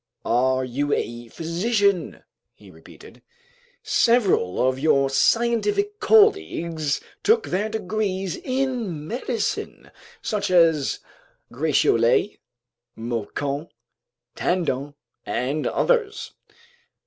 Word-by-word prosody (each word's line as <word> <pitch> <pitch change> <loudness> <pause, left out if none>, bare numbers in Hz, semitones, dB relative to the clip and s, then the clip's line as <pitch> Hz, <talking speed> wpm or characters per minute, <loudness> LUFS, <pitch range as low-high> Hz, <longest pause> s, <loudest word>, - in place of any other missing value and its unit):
"Are 130 +2 +1
you 140 +4 -1
a 120 +1 -3
physician?" 190 - -1 0.3
he - - -16
repeated. - - -16 0.6
"Several 195 - +2
of 130 0 -1
your 140 -2 +2
scientific 240 - +1
colleagues 390 - +2 0.2
took 450 +1 +3
their 205 +4 -1
degrees 200 -3 -2
in 255 - -3
medicine, 235 +1 -3 0.3
such 210 -2 -2
as 165 -5 +3 0.5
Gratiolet, 135 - +2 0.6
Moquin 125 +6 -4 0.7
Tandon, 145 -6 -1 0.3
and 140 +5 -2
others." 440 -4 0
175 Hz, 80 wpm, -23 LUFS, -, 0.7 s, took